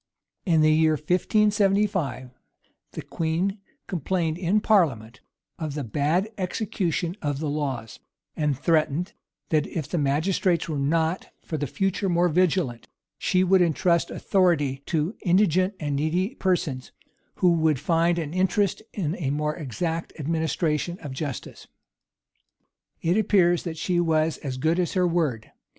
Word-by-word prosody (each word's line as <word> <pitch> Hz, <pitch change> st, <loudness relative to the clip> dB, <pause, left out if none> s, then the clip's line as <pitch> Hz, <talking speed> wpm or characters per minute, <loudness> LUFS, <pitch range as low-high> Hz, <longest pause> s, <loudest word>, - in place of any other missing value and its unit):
In 165 Hz, -3 st, +4 dB
the 155 Hz, 0 st, +5 dB
year 155 Hz, 0 st, +4 dB
1575, 190 Hz, -, +1 dB, 0.6 s
the -, -, -6 dB
queen 170 Hz, +5 st, -2 dB, 0.3 s
complained 170 Hz, -1 st, -1 dB
in 180 Hz, +4 st, +1 dB
parliament 135 Hz, -, +1 dB, 0.4 s
of 155 Hz, -3 st, -4 dB
the 145 Hz, -, -3 dB
bad 150 Hz, -, 0 dB
execution 180 Hz, -3 st, -2 dB
of 145 Hz, -2 st, -1 dB
the 155 Hz, +2 st, -3 dB
laws; 135 Hz, -7 st, -3 dB, 0.4 s
and 150 Hz, -4 st, 0 dB
threatened, 160 Hz, +3 st, +1 dB, 0.4 s
that 155 Hz, -2 st, +1 dB
if 155 Hz, -5 st, -4 dB
the 175 Hz, -, -2 dB
magistrates 165 Hz, +4 st, +1 dB
were 155 Hz, -3 st, -2 dB
not 160 Hz, +5 st, 0 dB, 0.2 s
for 160 Hz, -, -5 dB
the 145 Hz, -1 st, -2 dB
future 195 Hz, +6 st, -1 dB
more 175 Hz, 0 st, +3 dB
vigilant, 165 Hz, -8 st, +1 dB, 0.3 s
she 185 Hz, 0 st, +2 dB
would 185 Hz, 0 st, +4 dB
intrust 170 Hz, 0 st, +2 dB
authority 150 Hz, -8 st, +1 dB
to 165 Hz, +5 st, -1 dB
indigent 185 Hz, +1 st, +2 dB
and 145 Hz, -2 st, -2 dB
needy 175 Hz, -, 0 dB
persons, 175 Hz, -, -1 dB, 0.4 s
who 180 Hz, -, +3 dB
would 160 Hz, -4 st, +2 dB
find 170 Hz, +2 st, +2 dB
an 160 Hz, -2 st, -3 dB
interest 190 Hz, +2 st, +1 dB
in 170 Hz, -5 st, -2 dB
a 145 Hz, -6 st, -2 dB
more 150 Hz, +1 st, -1 dB
exact 165 Hz, +3 st, -4 dB
administration 160 Hz, +2 st, -1 dB
of 145 Hz, -, -7 dB
justice.[*] 135 Hz, 0 st, -6 dB, 1.4 s
It 175 Hz, +4 st, +2 dB
appears 185 Hz, -5 st, +3 dB
that 165 Hz, -2 st, -4 dB
she 175 Hz, +2 st, 0 dB
was 160 Hz, -2 st, +1 dB
as 130 Hz, -3 st, -5 dB
good 160 Hz, +6 st, +1 dB
as 175 Hz, -, 0 dB
her 185 Hz, -2 st, +2 dB
word. 155 Hz, -10 st, -1 dB
165 Hz, 140 wpm, -25 LUFS, 150-185 Hz, 1.4 s, the